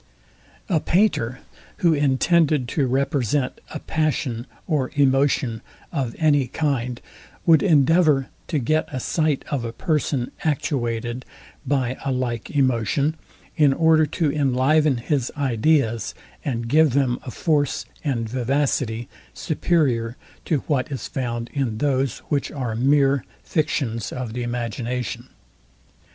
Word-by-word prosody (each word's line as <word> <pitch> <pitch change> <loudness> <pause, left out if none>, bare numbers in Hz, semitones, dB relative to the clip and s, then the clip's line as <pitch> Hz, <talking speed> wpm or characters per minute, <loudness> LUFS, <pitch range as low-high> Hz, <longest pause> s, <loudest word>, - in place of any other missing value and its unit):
A 175 -6 +2
painter, 150 - +1 0.4
who 165 - +6
intended 145 0 +2
to 140 -1 +1
represent 135 0 0
a - - -5
passion 140 -6 -1 0.2
or 145 -6 0
emotion 135 -4 +2 0.3
of 135 -7 -2
any 145 -5 +3
kind, 125 -6 -1 0.5
would 165 -2 +6
endeavour 155 -4 +4 0.2
to 160 - -1
get 155 +4 0
a 130 - -3
sight 155 +1 0
of 140 -5 -1
a 115 - -3
person 140 -2 -1
actuated 125 -5 -1 0.4
by 130 -3 0
a 135 - -1
like 125 -3 -2
emotion, 135 +2 +1 0.4
in 145 -3 +4
order 160 0 +4
to 155 0 0
enliven 140 +1 +2
his 130 +1 -1
ideas, 125 -3 +1 0.3
and 120 -4 -2
give 150 +1 +4
them 130 -3 +1
a - - -6
force 145 +1 0 0.2
and 120 -7 -1
vivacity 125 -1 -1 0.3
superior 130 -8 0 0.3
to 150 -5 +1
what 145 -1 0
is 135 - -4
found 120 -3 -3
in 130 -6 -1
those, 135 -1 0
which 145 -2 0
are 125 -6 -3
mere 135 +2 +3 0.2
fictions 130 -8 -1
of 125 -3 -5
the 125 - -3
imagination. 120 0 -3
135 Hz, 125 wpm, -23 LUFS, 120-150 Hz, 0.5 s, who